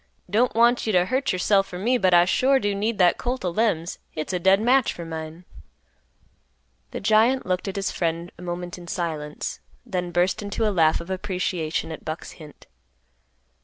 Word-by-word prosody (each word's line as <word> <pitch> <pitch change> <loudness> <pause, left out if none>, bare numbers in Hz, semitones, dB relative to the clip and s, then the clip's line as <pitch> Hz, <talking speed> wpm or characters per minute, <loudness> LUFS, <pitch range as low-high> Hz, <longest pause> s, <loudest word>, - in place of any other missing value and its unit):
Don't 235 +4 +1
want 235 +1 +3
you - - +2
t' 185 - +3
hurt 255 +11 +1
yourself 195 +2 +2
for 180 - -7
me, 235 +7 +1
but 185 -3 +3
I 175 0 +6
sure 265 +9 +3
do 205 -3 -1
need 210 +2 -1
that 180 -2 +4
colt 250 -3 -3
o' 180 - 0
Lem's; 175 -4 0
hit's 155 +4 -5
a 180 - 0
dead 190 +2 +4
match 255 +4 +3
for 170 - -8
mine." 160 +1 -7 1.4
The - - -5
giant 220 +6 +3
looked 185 +2 -1
at 195 - -4
his 195 -1 -1
friend 170 0 -2
a - - -14
moment 175 0 -5
in 175 - -12
silence, 155 -4 -4 0.3
then 180 -1 -3
burst 175 +3 +1
into 205 +2 -1
a 210 - 0
laugh 160 -3 +3
of 170 +3 -8
appreciation 180 -4 -2
at 160 - -8
Buck's 155 +1 -6
hint. 155 -3 -14
185 Hz, 190 wpm, -24 LUFS, 170-215 Hz, 1.4 s, I